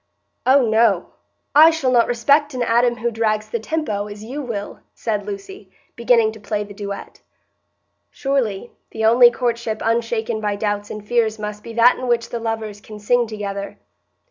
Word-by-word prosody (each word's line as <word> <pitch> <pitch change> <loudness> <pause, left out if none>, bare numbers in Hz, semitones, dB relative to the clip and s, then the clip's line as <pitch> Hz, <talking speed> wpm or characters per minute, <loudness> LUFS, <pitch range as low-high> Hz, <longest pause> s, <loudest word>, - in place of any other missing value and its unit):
'" - - -51
"Oh 270 -2 +5
no, 220 -4 +2 0.4
I 310 +3 +8
shall 320 -6 0
not 240 -2 +4
respect 285 +4 +2
an 250 - 0
Adam 240 +1 +2
who 235 +1 -1
drags 215 -1 -1
the 235 - -1
tempo, 220 -6 -2
as 205 0 -9
you 265 +7 -5
will," 225 -6 -5 0.2
said 210 -3 -3
Lucy, 200 -1 -8 0.3
beginning 235 -2 +3
to 220 - -12
play 210 0 -3
the 205 0 -11
duet. 200 -1 -7 0.9
Surely 240 -6 -2 0.2
the 220 - -2
only 240 +2 +7
courtship 235 -2 -2
unshaken 230 -1 -1
by 205 -1 -1
doubts 205 0 -2
and 210 -1 -8
fears 225 -2 +1
must 210 0 -6
be 230 - -9
that 235 +2 +5
in 255 - -4
which 235 -1 0
the 235 - -4
lovers 220 -2 -4
can 215 +1 -11
sing 240 +3 +1
together. 200 -2 -5
225 Hz, 175 wpm, -20 LUFS, 210-240 Hz, 0.9 s, I